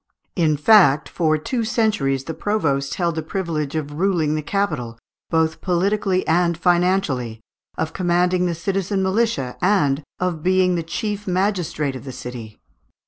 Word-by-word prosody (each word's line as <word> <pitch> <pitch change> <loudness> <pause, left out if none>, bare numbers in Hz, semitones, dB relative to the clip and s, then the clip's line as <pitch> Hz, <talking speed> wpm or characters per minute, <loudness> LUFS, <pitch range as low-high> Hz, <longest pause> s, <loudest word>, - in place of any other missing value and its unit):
In 155 -4 +2
fact, 150 -5 +5
for 155 -3 +1
two 235 +10 -2
centuries 210 - 0
the 160 - -5
provost 145 -10 -1
held 170 -2 0
the 160 - -3
privilege 160 -4 -3
of 145 -2 -3
ruling 175 -6 +1
the 155 - -1
capital, 150 - -2 0.3
both 160 -1 +1
politically 190 +1 +1
and 170 0 +2
financially, 175 - +1 0.4
of 160 - -2
commanding 180 0 +1
the 170 - -2
citizen 195 +2 -1
militia, 190 - 0
and 160 -8 +2 0.2
of 180 -4 -2
being 180 -1 +2
chief 205 +4 -4
magistrate 180 -7 -1
of 130 - -8
the 130 - -6
city. 125 -4 -8
170 Hz, 140 wpm, -21 LUFS, 150-190 Hz, 0.4 s, fact